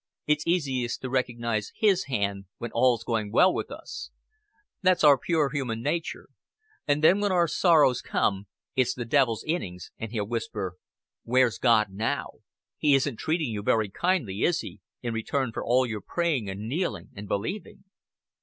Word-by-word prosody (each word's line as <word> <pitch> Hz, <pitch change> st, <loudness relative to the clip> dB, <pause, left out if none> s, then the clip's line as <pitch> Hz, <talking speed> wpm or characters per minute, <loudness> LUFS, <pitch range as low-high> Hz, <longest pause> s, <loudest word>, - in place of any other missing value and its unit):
It's 150 Hz, +1 st, +1 dB
easiest 135 Hz, -8 st, 0 dB
to 130 Hz, -, -4 dB
recognize 115 Hz, -4 st, -1 dB
His 195 Hz, -4 st, +3 dB
hand 100 Hz, -6 st, -2 dB
when 120 Hz, -1 st, -6 dB
all's 120 Hz, 0 st, +3 dB
going 110 Hz, -3 st, -2 dB
well 185 Hz, -, +5 dB
with -, -, -3 dB
us. -, -, -8 dB, 0.7 s
That's 185 Hz, -3 st, +3 dB
our 145 Hz, -2 st, +8 dB
poor 150 Hz, +1 st, 0 dB
human 125 Hz, -6 st, -3 dB
nature. 160 Hz, +3 st, -3 dB, 0.6 s
And 145 Hz, +1 st, +1 dB
then 185 Hz, +5 st, +6 dB
when 205 Hz, -1 st, +1 dB
our 175 Hz, -2 st, +3 dB
sorrows 155 Hz, -8 st, +4 dB
come, 100 Hz, 0 st, -1 dB, 0.3 s
it's 130 Hz, -2 st, +2 dB
the 120 Hz, -, -4 dB
devil's 115 Hz, -3 st, +2 dB
innings, 90 Hz, -, -4 dB
and 110 Hz, -1 st, -5 dB
he'll 110 Hz, -3 st, -2 dB
whisper: 105 Hz, -5 st, -4 dB, 0.5 s
'Where's 125 Hz, -4 st, +2 dB
God 110 Hz, -5 st, +3 dB
now? 110 Hz, +4 st, -3 dB, 0.4 s
He 145 Hz, -2 st, +4 dB
isn't 135 Hz, -3 st, 0 dB
treating 155 Hz, -5 st, -1 dB
you 105 Hz, -2 st, -3 dB
very 110 Hz, 0 st, +1 dB
kindly, 135 Hz, -, 0 dB
is 170 Hz, 0 st, +2 dB
He, -, -, -9 dB, 0.2 s
in 120 Hz, -1 st, -2 dB
return 115 Hz, +3 st, -1 dB
for -, -, -4 dB
all 125 Hz, +2 st, +3 dB
your 110 Hz, -4 st, -4 dB
praying 155 Hz, -, -1 dB
and 100 Hz, +3 st, -5 dB
kneeling 170 Hz, +9 st, -2 dB
and 105 Hz, 0 st, -8 dB
believing?'" 145 Hz, -, -4 dB
125 Hz, 165 wpm, -27 LUFS, 110-155 Hz, 0.7 s, our